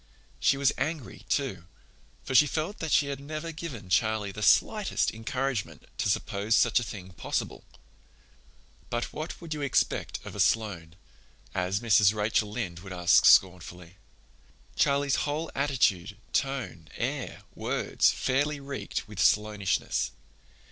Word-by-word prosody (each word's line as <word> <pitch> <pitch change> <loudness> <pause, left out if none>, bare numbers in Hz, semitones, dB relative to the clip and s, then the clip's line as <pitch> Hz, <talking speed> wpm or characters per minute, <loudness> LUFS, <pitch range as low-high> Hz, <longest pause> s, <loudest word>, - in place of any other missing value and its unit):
She 135 - +3
was 140 -1 +3
angry, 145 - -4
too, 85 - -1 0.6
for - - -5
she 145 +3 +7
felt 160 +8 -3
that 160 -2 -3
she 140 -2 +3
had 140 -1 -4
never 155 +3 -5
given 150 - -7
Charlie 105 +2 +1
the 105 - -8
slightest 210 - +3
encouragement 125 0 -3
to - - +1
suppose 105 +2 0
such 120 -1 +4
a - - -3
thing 95 -5 -8
possible. 90 - -4 1.3
But 120 0 -3
what 155 +3 -5
could 165 -2 -6
you 150 - -5
expect 140 -3 0
of - - -8
a - - -7
Sloane, 95 -7 0 0.6
as 95 +3 -1
Mrs. 105 -3 +4
Rachel 105 0 +1
Lynde 105 -6 -4
would 95 +1 -9
ask 90 -1 +4
scornfully? 90 -1 +3 0.8
Charlie's 140 0 +2
whole 155 +3 -2
attitude, 115 -9 +1 0.2
tone, 115 - -2
air, - - -4
words, - - +1
fairly 145 +3 0
reeked 140 -5 -5
with 105 -2 -9
Sloanishness. 105 0 +1
115 Hz, 135 wpm, -28 LUFS, 95-140 Hz, 1.3 s, she